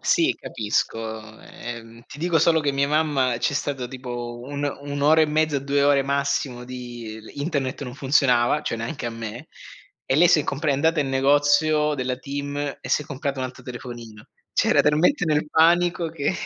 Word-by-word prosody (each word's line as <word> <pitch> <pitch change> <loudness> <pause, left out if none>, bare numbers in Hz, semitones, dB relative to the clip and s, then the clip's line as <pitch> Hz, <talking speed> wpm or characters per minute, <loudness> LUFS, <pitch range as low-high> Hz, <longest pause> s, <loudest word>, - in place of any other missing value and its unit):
Sì 340 +1 +3
capisco, 110 0 -3
ehm, 115 0 -9
ti 145 - -11
dico 170 0 +2
solo 160 +1 +4
che 145 -1 +1
mia 140 0 +1
mamma 145 -4 +1
c'è 140 - 0
stato 140 -4 -2
tipo 120 -2 -6
un'o 145 0 -4
1'ora 145 +2 +3
e - - +3
mezza, 150 -1 +1
2 140 +1 0
ore 140 -1 +4
massimo 140 -2 -1
di 120 -3 -8
l 110 - -13
internet 140 -3 -2
non 125 -2 -6
funzionava, 135 0 +3
cioè, 115 - -2
neanche 120 +3 -4
a - - -2
me. 115 0 -7 0.6
E - - +2
lei 170 +4 +6
si 175 - +6
è - - -1
compra 145 +2 -1
è - - +3
andata 160 +3 +2
in 140 - -1
negozio 145 +3 +3
della 130 -2 -2
TIM 140 +2 -5 0.2
e - - -8
si - - +2
è - - -14
comprata 140 -1 -4
un - - -1
altro 130 - -12
telefonino. 120 -4 -9 0.2
Cioè, - - +2
era - - +5
talmente 165 - +3
nel 150 -1 0
panico 170 0 +3
che 155 +1 -1
140 Hz, 190 wpm, -23 LUFS, 125-150 Hz, 0.6 s, lei